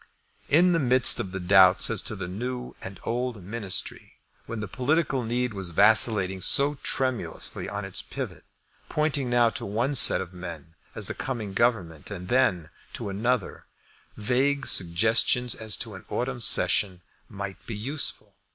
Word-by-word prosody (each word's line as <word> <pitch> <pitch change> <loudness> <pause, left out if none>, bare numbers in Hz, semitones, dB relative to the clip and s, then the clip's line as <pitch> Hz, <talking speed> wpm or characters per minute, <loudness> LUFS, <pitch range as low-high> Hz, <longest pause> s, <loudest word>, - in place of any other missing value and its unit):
In 175 +5 +4
the 165 - +2
midst 130 -3 +4
of 95 - -4
the 95 - -5
doubts 95 +2 +5
as 115 - -1
to 110 - -3
the 95 -3 -6
new 125 +6 -6
and 95 +1 -9
old 120 -3 -3
Ministry, 100 -1 -4 0.3
when 115 - -5
the 110 - -5
political 135 - 0
needle 120 -1 -2
was 95 -2 -3
vacillating 100 0 +4
so 140 +8 +4
tremulously 130 -2 0
on 100 0 -5
its 95 - -1
pivot, - - -7 0.5
pointing 145 -4 -1
now 120 -1 +3
to - - -6
one 115 +8 -1
set 140 - +5
of 95 -1 -7
men 85 -3 -9 0.2
as - - -5
the - - -4
coming 115 -7 -5
Government 95 -9 -1
and 90 -3 -8
then 115 -11 +1 0.2
to - - -5
another, 110 +2 -2 0.5
vague 130 +6 0
suggestions 110 +7 +2
as 110 -2 -2
to 115 -3 -4
an 95 - -10
autumn 125 0 -3
session 90 -2 +2 0.3
might 100 -1 -7
be 115 - -5
useful. 110 -3 -2
110 Hz, 160 wpm, -26 LUFS, 95-125 Hz, 0.5 s, doubts